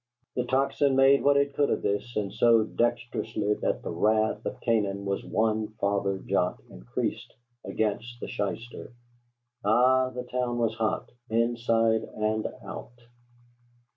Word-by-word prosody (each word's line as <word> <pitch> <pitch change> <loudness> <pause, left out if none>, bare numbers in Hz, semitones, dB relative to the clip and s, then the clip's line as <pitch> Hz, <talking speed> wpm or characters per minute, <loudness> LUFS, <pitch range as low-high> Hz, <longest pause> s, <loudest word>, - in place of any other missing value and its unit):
The 125 - 0
Tocsin 135 +2 +2
made 135 +1 +6
what 140 0 +5
it 140 0 +2
could 145 0 +2
of - - -1
this, 105 +4 -1
and 100 -2 -2
so 115 -2 +5
dexterously 115 -2 -1
that - - -1
the - - -4
wrath 110 +5 +1
of - - -5
Canaan 100 -4 0
was 100 0 -2
one 110 0 0
farther 100 -1 0
jot - - 0
increased - - -4 0.3
against 110 +3 -2
the - - -5
shyster. 115 +5 -5 0.7
Ay, 130 +5 +4
the 125 - -3
town 125 -1 -2
was 115 -2 +1
hot, 110 -1 -2 0.2
inside 115 -1 +2
and 110 0 0 0.2
out. 120 - -8
115 Hz, 140 wpm, -27 LUFS, 105-125 Hz, 0.7 s, made